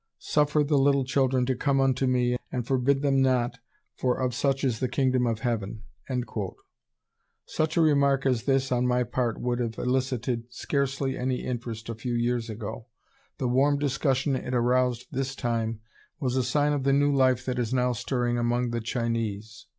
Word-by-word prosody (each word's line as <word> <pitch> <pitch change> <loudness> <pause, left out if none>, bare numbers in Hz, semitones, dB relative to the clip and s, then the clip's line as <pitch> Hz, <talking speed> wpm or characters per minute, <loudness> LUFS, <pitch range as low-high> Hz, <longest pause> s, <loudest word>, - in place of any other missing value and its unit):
"Suffer 150 0 +2
the 145 -1 +2
little 140 -1 +3
children 130 -1 +2
to 130 - +1
come 135 +2 +1
unto 135 0 +2
me 125 -1 +2 0.2
and 125 -2 -2
forbid 135 +2 +1
them 135 -2 +3
not, 125 -2 +1 0.4
for 125 -1 0
of 130 -1 0
such 135 +2 0
is 120 -5 0
the 130 - -1
Kingdom 130 -1 +1
of 110 -2 -1
Heaven." 110 -2 -2 1.6
Such 155 +1 -1
a - - +5
remark 140 -3 +3
as 125 -3 +1
this 135 -1 +1
on 125 0 +2
my 125 0 +2
part 120 0 -2
would 120 0 -1
have 115 -2 -2
elicited 125 -2 -1
scarcely 135 +1 -1
any 125 0 -2
interest 115 -3 -5
a 115 - -3
few 120 +2 -3
years 120 -1 0
ago. 110 +1 -6 0.5
The 130 - -1
warm 135 +4 +3
discussion 135 -1 0
it 125 0 -3
aroused 125 0 +1
this 135 0 -2
time 115 -3 -2 0.4
was 130 -4 -1
a 130 - +3
sign 145 +4 +1
of 145 - 0
the 135 0 +3
new 145 +1 +3
life 130 -2 +3
that 125 -1 -2
is 115 -3 -1
now 125 -1 +2
stirring 120 0 -1
among 120 +1 0
the 120 0 -2
Chinese. 115 -2 -3
125 Hz, 180 wpm, -27 LUFS, 120-135 Hz, 1.6 s, a